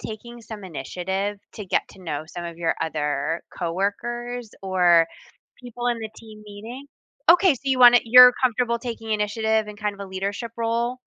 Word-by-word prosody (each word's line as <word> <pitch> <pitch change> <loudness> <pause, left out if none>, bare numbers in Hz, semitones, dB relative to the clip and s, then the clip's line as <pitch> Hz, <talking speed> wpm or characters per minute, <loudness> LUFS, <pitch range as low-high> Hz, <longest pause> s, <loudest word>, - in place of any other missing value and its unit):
taking 235 +2 -9
some 215 -3 -9
initiative 190 +6 -4
to 210 - -8
get - - +1
to 195 - -16
know 155 -3 -4
some 175 +2 -8
of 170 -1 -8
your 165 -1 0
other 150 0 -2
coworkers 230 +7 -3
or 175 -3 +4 0.5
people 245 0 -4
in 240 - -1
the 220 -1 -5
team 215 -2 -13
meeting? 220 +7 -10 0.4
Okay, 355 -1 +6
so 255 - -14
you 265 -2 0
wanna 245 0 +9
you're 250 +2 +9
comfortable 240 -2 +1
taking 230 -2 -6
initiative 220 +1 0
in 210 0 -9
kind 210 -1 -3
of 200 - -15
a - - -14
leadership 200 +5 -4
role? 235 +2 -1
215 Hz, 175 wpm, -23 LUFS, 190-240 Hz, 0.5 s, wanna